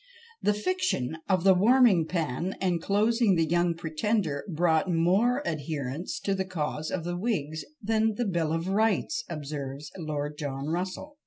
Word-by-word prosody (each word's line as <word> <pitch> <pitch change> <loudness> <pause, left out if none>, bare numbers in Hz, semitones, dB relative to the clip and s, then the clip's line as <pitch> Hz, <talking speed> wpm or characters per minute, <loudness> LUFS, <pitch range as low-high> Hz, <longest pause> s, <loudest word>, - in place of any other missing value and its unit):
"The 210 - +2
fiction 210 - -1
of 185 -3 +2
the 190 0 +7
warming 210 -4 +5
pan 170 +1 -2
enclosing 200 +4 +2
the 165 -1 +2
young 175 +1 +1
Pretender 165 -1 -1
brought 165 +1 +2
more 200 - +2
adherents 150 0 -3
to 195 - 0
the 190 0 0
cause 155 -4 -3
of 180 - -3
the 175 +1 -3
Whigs 165 -7 -2 0.2
than 220 0 +2
the 245 - -1
Bill 170 -5 0
of 165 +2 -1
Rights," 220 +3 +1
observes 145 -2 -5
Lord 150 -3 -4
John 140 -2 -4
Russell. 185 - -4
175 Hz, 150 wpm, -28 LUFS, 155-205 Hz, 0.2 s, the